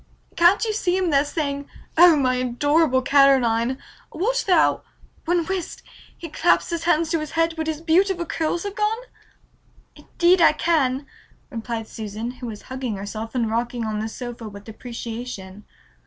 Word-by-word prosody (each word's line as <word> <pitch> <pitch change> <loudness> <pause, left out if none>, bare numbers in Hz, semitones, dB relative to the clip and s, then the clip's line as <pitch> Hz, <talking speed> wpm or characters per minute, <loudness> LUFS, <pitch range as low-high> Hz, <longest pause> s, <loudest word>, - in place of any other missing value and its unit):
"Can't 355 +6 +4
you 435 - -1
see 370 -4 0
him 365 -3 0
there, 280 -1 +4
saying, 285 -2 -3 0.3
'Oh, 345 0 +8
my 260 -3 +2
adorable 260 +3 +1
Caroline, 260 -3 +3 0.3
wilt - - -1
thou 365 - +3 0.2
' - - -30
when 345 0 +1
whist! 370 -1 -4 0.3
he 335 - -7
claps 340 +3 +1
his 335 -1 -3
hands 330 -1 +2
to 330 - +1
his 305 0 -6
head, 330 0 +1
but 320 -1 -3
his 315 -1 -3
beautiful 350 +2 +2
curls 330 +1 -2
have 405 -1 -4
gone?" 425 +1 0 1.0
"Indeed 350 +1 +2
I 325 - +6
can," 290 -5 +1 0.5
replied 230 -1 -5
Susan, 220 +2 -6
who 250 -1 -8
was 215 -2 -8
hugging 255 -4 -4
herself 215 +4 -6
and 235 -3 +1
rocking 235 +1 -2
on 215 -1 -2
the 220 +1 -3
sofa 240 -1 -7
with 200 +1 -12
appreciation. 225 -3 -7
280 Hz, 165 wpm, -23 LUFS, 235-335 Hz, 1.0 s, Oh